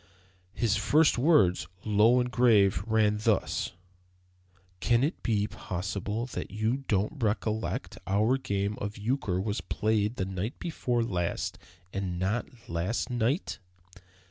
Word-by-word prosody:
His 110 -3 +1
first 150 +6 +3
words, 120 - +4 0.2
low 110 +4 +5
and 125 0 -1
grave, 105 -8 +4
ran 110 -1 +2
thus: 110 -4 0 1.1
"Can 120 +5 +3
it 155 +5 -1
be 105 -4 +1
possible 100 +4 -4 0.2
you 110 +5 0
don't 105 +8 0
recollect 110 0 -1
that - - -12
our 110 +7 +2
game 100 -4 -2
of 105 +1 -4
euchre 105 -4 -1
was 105 +2 -2
played 110 +1 0
the 95 - -1
night 95 - -4
before 125 -8 -1
last 90 -7 -2 0.3
and 95 -3 -2
not 95 +7 -1 0.2
last 85 +9 -2
night?" 120 - 0
110 Hz, 125 wpm, -29 LUFS, 100-120 Hz, 1.1 s, low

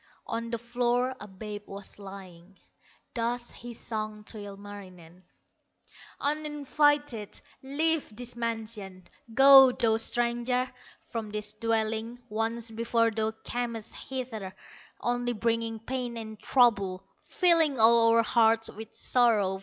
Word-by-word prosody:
On 230 0 -4
the 235 - -2
floor 245 +2 0
a 205 - -9
babe 205 +1 -7
was 200 +1 -8
lying, 190 -2 -11 0.6
Thus 240 +1 -2
he 240 0 -10
sang 215 -2 -5
to 215 +1 -7
Ilmarinen: 195 -4 -11 1.0
"Uninvited, 290 -5 0 0.2
leave 310 +3 0
this 245 +1 -4
mansion, 220 -5 -5 0.3
Go, 270 -1 +9
thou 225 -2 +2
stranger, 240 +2 0 0.3
from 225 -2 -5
this 210 0 -3
dwelling; 225 +1 -1
Once 225 +1 -2
before 230 0 +1
thou 220 0 0
camest 235 -2 -4
hither, 225 -8 -6 0.4
Only 245 0 -1
bringing 230 0 -1
pain 245 +1 -4
and 220 -2 -7
trouble, 200 -7 +2 0.2
Filling 330 - +3
all 230 0 +6
our 230 - +5
hearts 225 -1 +3
with 220 +1 -10
sorrow. 210 -6 +3
230 Hz, 115 wpm, -28 LUFS, 210-245 Hz, 1.0 s, Go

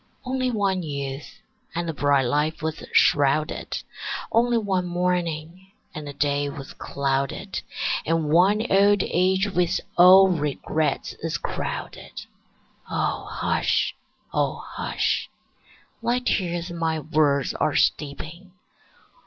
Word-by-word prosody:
Only 255 0 0
one 200 -5 0
youth, 140 +5 -6 0.3
and 170 0 -2
the 165 - -2
bright 145 -2 +2
life 150 +5 0
was 160 0 -3
shrouded; 145 +2 +2 0.5
Only 235 +1 +3
one 190 -5 0
morning, 175 0 -2 0.3
and 150 -1 -7
the 145 - -6
day 145 0 0
was 140 -2 -8
clouded; 140 -1 -2 0.4
And 165 -1 0
one 195 +7 +4
old 200 0 +5
age 190 +3 +2
with 180 -2 +1 0.2
all 190 +2 +9
regrets 150 -2 -1
is 165 0 -2
crowded. - - -5 0.6
O - - -1
hush, - - 0 0.4
O - - 0
hush! - - -1 0.7
Thy 235 +1 +1
tears 175 -7 -1
my 165 -2 -1
words 150 -3 +1
are - - 0
steeping. 160 +6 -1
165 Hz, 110 wpm, -24 LUFS, 145-190 Hz, 0.7 s, all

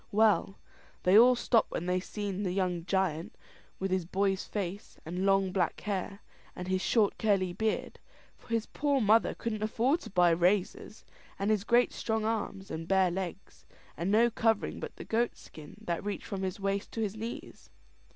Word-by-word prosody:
Well, 210 -2 +3 0.5
they 185 +2 +4
all 245 +3 +8
stopped 235 -1 +2
when 170 - -4
they 180 0 +1
seen 200 0 -4
the 190 -3 -1
young 180 -3 -1
giant, 175 -3 -1 0.4
with 195 0 -3
his 185 -1 +1
boy's 195 +2 0
face, 200 -1 -5
and 180 +4 -2
long 195 -1 +3
black 180 -3 0
hair, 200 0 -3 0.3
and 180 - -6
his 185 0 0
short 215 -2 +2
curly 195 -4 +1
beard 220 +3 -2 0.4
for - - -22
his 230 -1 0
poor 285 -1 0
mother 220 0 +3
couldn't 215 -2 -4
afford 235 +8 +1
to - - -10
buy 180 -2 +4
razors 180 +5 0 0.3
and 200 +2 0
his 210 -2 +1
great 240 +2 +3
strong 220 -1 -1
arms, 205 -3 -3
and 160 +1 -5
bare 190 -1 +3
legs, 185 +1 -6 0.3
and 170 +3 -2
no 230 +3 +4
covering 225 -1 0
but - - -7
the - - -9
goat 235 +2 0
skin 150 -2 -12
that 170 +2 -3
reached 205 0 -4
from 195 -1 -4
his 190 +1 -3
waist 195 0 -2
to 225 - -3
his 210 -1 -2
knees. 225 +2 -7
195 Hz, 180 wpm, -30 LUFS, 185-220 Hz, 0.5 s, all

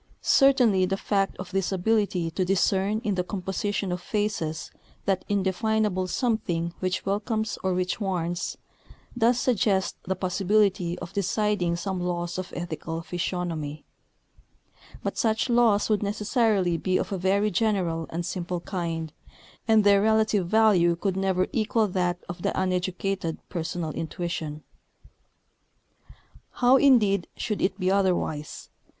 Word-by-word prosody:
Certainly 245 -9 +4
the 195 +1 -1
fact 195 -1 0
of 185 -1 -7
this 195 0 0
ability 190 -3 +1
to 185 +3 -1
discern 195 +3 +1
in 210 - 0
the 180 -1 0
composition 195 +1 -3
of 180 0 -3
faces 200 -6 -2 0.3
that 190 -2 +1
indefinable 200 0 0
something 175 -7 -1
which 185 0 -2
welcomes 215 +2 -1
or 190 -1 0
which 185 +4 -1
warns, 175 -3 -2 0.6
does 240 +1 +3
suggest 205 -6 +1
the 190 - -1
possibility 185 -1 +1
of - - -8
deciding 200 -2 0
some 190 +1 -3
laws 175 0 -2
of 185 - -6
ethical 165 -1 -5
physiognomy; 165 -3 -3 1.2
but - - -3
such 225 +2 +1
laws 230 -4 +4
would 215 -2 +1
necessarily 210 -3 +1
be 185 +3 0
of - - -3
a 195 - -1
very 200 +3 +2
general 180 -5 0
and 170 +1 -3
simple 180 0 -3
kind, 165 -4 -4 0.5
and 220 -1 +5
their 200 -1 +5
relative 215 -3 +2
value 190 -5 +4
could 190 +2 -2
never 190 -1 +1
equal 220 0 +1
that 180 -2 0
of 175 0 -7
the - - -1
uneducated 185 -1 -1
personal 170 -1 -3
intuition. 160 -2 -4 1.9
How, 250 +2 +5
indeed, 215 -9 +4
should 210 - -2
it 190 +1 0
be 185 0 +1
otherwise? 180 -6 -1
190 Hz, 130 wpm, -26 LUFS, 175-210 Hz, 1.9 s, and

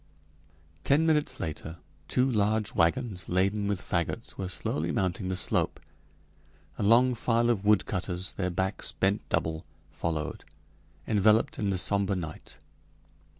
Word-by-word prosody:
Ten 150 +4 +3
minutes 155 -2 +1
later 80 +1 -5 0.3
two 125 +1 +2
large 110 -1 +1
wagons 95 +1 0
laden 100 +3 +1
with 100 -2 -1
fagots 90 +6 -2
were 95 -2 -4
slowly 85 -2 -1
mounting 95 +1 -1
the 95 - -1
slope. - - 0 1.0
A - - -1
long 120 +5 +5
file 120 0 +1
of 105 -4 -2
woodcutters, 95 -3 0
their 90 -2 -2
backs 95 +3 -1
bent 100 +2 +1
double, 80 0 -1 0.3
followed, 80 -3 -3 0.6
enveloped 110 +1 +3
in 100 - 0
the 95 - 0
somber 100 +2 +2
night. 80 -4 -7
100 Hz, 130 wpm, -28 LUFS, 90-110 Hz, 1.0 s, long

